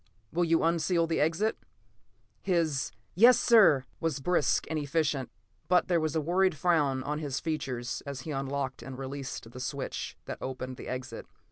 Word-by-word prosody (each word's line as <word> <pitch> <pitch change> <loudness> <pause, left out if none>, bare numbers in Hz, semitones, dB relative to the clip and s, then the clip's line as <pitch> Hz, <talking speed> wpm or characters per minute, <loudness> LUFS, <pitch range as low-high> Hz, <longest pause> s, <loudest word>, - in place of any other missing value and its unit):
Will 175 +2 +2
you 165 -1 +2
unseal 165 +1 +2
the 165 -1 -1
exit?" 165 +8 +1 0.8
His 165 -7 0 0.2
"Yes, 240 +7 +7
sir!" 195 - +6
was 160 -4 -1
brisk 175 +2 +1
and 160 -1 -1
efficient, 145 -3 0 0.4
but 180 +1 +3
there 175 -2 +3
was 155 -1 -1
a 160 - +2
worried 180 +2 +2
frown 145 -5 +2
on 150 +2 -2
his 140 -3 -3
features 130 -6 -3
as 140 -2 -6
he 155 - -6
unlocked 135 -1 -3
and 130 -1 -8
released 135 -3 -6
the 125 - -9
switch 135 +1 -4
that - - -6
opened 130 -1 -5
the - - -8
exit. 130 -2 -6
150 Hz, 165 wpm, -29 LUFS, 135-165 Hz, 0.8 s, Yes